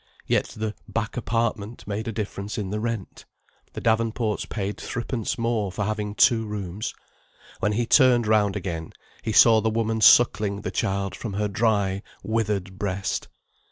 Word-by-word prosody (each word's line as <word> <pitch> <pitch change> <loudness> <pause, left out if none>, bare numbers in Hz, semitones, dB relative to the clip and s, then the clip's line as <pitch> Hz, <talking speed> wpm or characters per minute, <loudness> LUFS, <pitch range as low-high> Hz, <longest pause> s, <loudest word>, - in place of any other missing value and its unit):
Yet - - +2
the 110 -1 -2
"back 115 -1 -3
apartment" 115 -2 -2
made 105 +3 -4
a - - -1
difference 105 0 -4
in 100 -3 -3
the 105 - -2
rent. 115 -3 -4 0.5
The - - -6
Davenports 110 -1 0
paid 100 -1 -3
threepence 120 0 -3
more 115 -4 0
for 105 - -3
having 105 -1 -3
two 115 0 +4
rooms. 105 +1 -4 0.6
When 105 - +1
he 120 +3 0
turned 125 -2 +5
round 105 -2 +3
again, 85 -5 -4 0.3
he 110 - -2
saw 110 0 +7
the 110 - +1
woman 110 0 -1
suckling 105 -4 +5
the - - -4
child 100 -3 -1
from 110 -4 -5
her 105 +1 0
dry, 100 -2 +1 0.2
withered 105 -4 -1
breast. 95 -1 -2
105 Hz, 160 wpm, -25 LUFS, 100-115 Hz, 0.6 s, saw